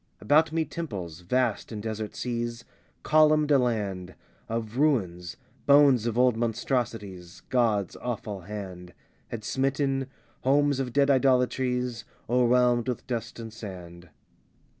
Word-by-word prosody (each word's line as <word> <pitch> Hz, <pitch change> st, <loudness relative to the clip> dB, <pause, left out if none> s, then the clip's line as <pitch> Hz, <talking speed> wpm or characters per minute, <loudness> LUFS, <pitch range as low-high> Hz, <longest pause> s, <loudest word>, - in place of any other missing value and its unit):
About 155 Hz, +3 st, +3 dB
me 160 Hz, 0 st, 0 dB
temples, 95 Hz, -, -6 dB
vast 120 Hz, +6 st, -1 dB
in 110 Hz, -, -5 dB
desert 110 Hz, 0 st, -5 dB
seas, 120 Hz, -1 st, -3 dB, 0.4 s
Columned 155 Hz, -1 st, +4 dB
a 140 Hz, -, +6 dB
land 100 Hz, -7 st, -2 dB, 0.3 s
Of 115 Hz, 0 st, -4 dB
ruins 95 Hz, -, 0 dB, 0.3 s
bones 140 Hz, -5 st, +6 dB
of 115 Hz, 0 st, -2 dB
old 125 Hz, -1 st, +4 dB
monstrosities 110 Hz, -6 st, -3 dB
God's 110 Hz, -7 st, +1 dB
awful 105 Hz, -5 st, -5 dB
hand 90 Hz, -2 st, -8 dB, 0.3 s
Had 110 Hz, -2 st, -6 dB
smitten; 135 Hz, +2 st, 0 dB, 0.3 s
homes 140 Hz, +1 st, +2 dB
of 130 Hz, -2 st, -2 dB
dead 140 Hz, +2 st, +3 dB
idolatries, 125 Hz, -2 st, +1 dB, 0.2 s
O'erwhelmed 125 Hz, 0 st, +3 dB
with 125 Hz, -, -3 dB
dust 120 Hz, -2 st, -4 dB
and 115 Hz, -1 st, -8 dB
sand. 90 Hz, -5 st, -9 dB
120 Hz, 120 wpm, -27 LUFS, 105-130 Hz, 0.4 s, a